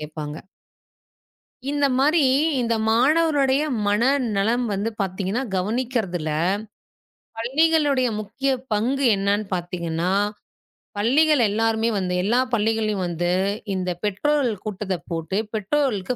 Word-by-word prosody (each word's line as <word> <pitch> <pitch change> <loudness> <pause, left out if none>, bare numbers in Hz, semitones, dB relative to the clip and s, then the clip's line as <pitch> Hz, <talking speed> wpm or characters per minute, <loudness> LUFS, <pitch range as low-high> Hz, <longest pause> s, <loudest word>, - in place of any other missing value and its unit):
கேட்பாங்க. 150 -1 -6 1.3
இந்த 290 0 +1
மாரி, 300 +5 +3 0.4
இந்த 235 -1 +1
மாணவர்களுடைய 280 +2 +3 0.2
மனநலம் 235 0 +1
வந்து 200 +3 -1
பாத்தீங்கன்னா, 195 +5 -2
கவனிக்கிறதுல 205 -5 -1 1.1
பள்ளிகளுடைய 285 +1 +2
முக்கிய 230 +7 -2 0.2
பங்கு 255 +6 0
என்னன்னு 200 +2 0
பாத்தீங்கன்னா, 175 -1 -2 0.9
பள்ளிகள் 280 +7 +3
எல்லாருமே 225 +2 +1
வந்து 185 -2 -1
எல்லா 230 +6 +2
பள்ளிகளிலும் 215 -3 0
வந்து 175 +1 -1 0.4
இந்தத் 180 -2 -3
பெற்றோர்கள் 235 0 0
கூட்டத்த 195 -2 -3
போட்டு, 165 +4 -2 0.2
பெற்றோர்களுக்கு 220 0 0
220 Hz, 95 wpm, -23 LUFS, 190-265 Hz, 1.3 s, மாரி